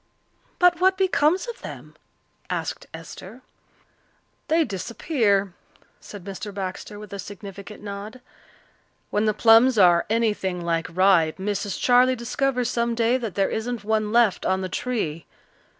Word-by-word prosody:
"But 355 -1 +4
what 375 +1 +4
becomes 370 +1 +2
of 475 - -7
them?" - - -9 0.5
asked - - -4
Esther. - - -10 1.0
"They 325 +1 +3
disappear," 200 - 0 0.5
said 205 -3 -11
Mr. 200 +2 -7
Baxter, 195 +1 -6
with 210 -1 -10
a 200 - -6
significant 200 +1 -9
nod. 205 +4 -7 0.9
"When 210 +1 +1
the 215 - +2
plums 230 +3 +6
are 175 -3 +5
anything 210 -5 0
like 165 -1 0
ripe 170 -2 +3
Mrs. 205 0 -3
Charley 250 +1 +4
discovers 250 +1 -1
some 235 0 -1
day 235 +2 +2
that 230 -6 -5
there 195 -1 +1
isn't 230 0 -3
one 215 0 0
left 230 -4 +3
on 190 0 0
the 185 - -4
tree. 180 -12 -3
215 Hz, 135 wpm, -24 LUFS, 195-245 Hz, 1.0 s, plums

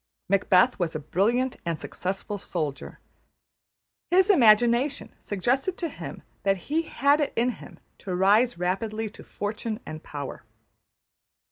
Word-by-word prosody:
Macbeth 195 +3 +4
was 170 -3 -1
a - - -1
brilliant 230 - 0
and 170 -2 -2
successful 195 +2 -4
soldier; 155 -7 -4 1.1
his 375 +3 +5
imagination 240 - +4
suggested 260 - -1
to 335 - -2
him - - -8 0.2
that 195 -1 +2
he 295 - -1
had 285 -1 +2
it 290 - 0
in 240 +2 +2
him - - -12 0.2
to 185 -2 -4
rise 210 +6 +4
rapidly 215 +5 -2
to - - -13
fortune 215 +2 -4
and 155 0 -7
power. 140 -5 -7
215 Hz, 130 wpm, -26 LUFS, 180-255 Hz, 1.1 s, his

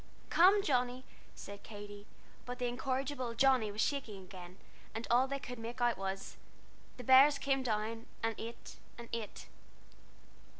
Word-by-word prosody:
"Come, 390 +4 +6
Johnnie," 250 -3 +1 0.3
said 200 0 -9
Katy, 205 -1 -10 0.4
but 245 0 -4
the 250 - -1
incorrigible 255 0 -2
Johnnie 255 -4 +4
was 210 +2 -2
shaking 220 -9 -1
again, 180 -1 -11 0.4
and 225 +1 -3
all 250 +2 +5
they 275 +1 -2
could 250 -3 -7
make 235 +2 -6
out 240 -1 +3
was 195 0 -5 0.6
"The 250 - -7
bears 270 +4 +7
came 275 -1 +1
down, 225 -1 -2 0.2
and 225 0 +1
ate 230 +1 -8 0.2
and 235 -1 -9
ate." 225 -3 -5
240 Hz, 145 wpm, -34 LUFS, 215-260 Hz, 0.6 s, bears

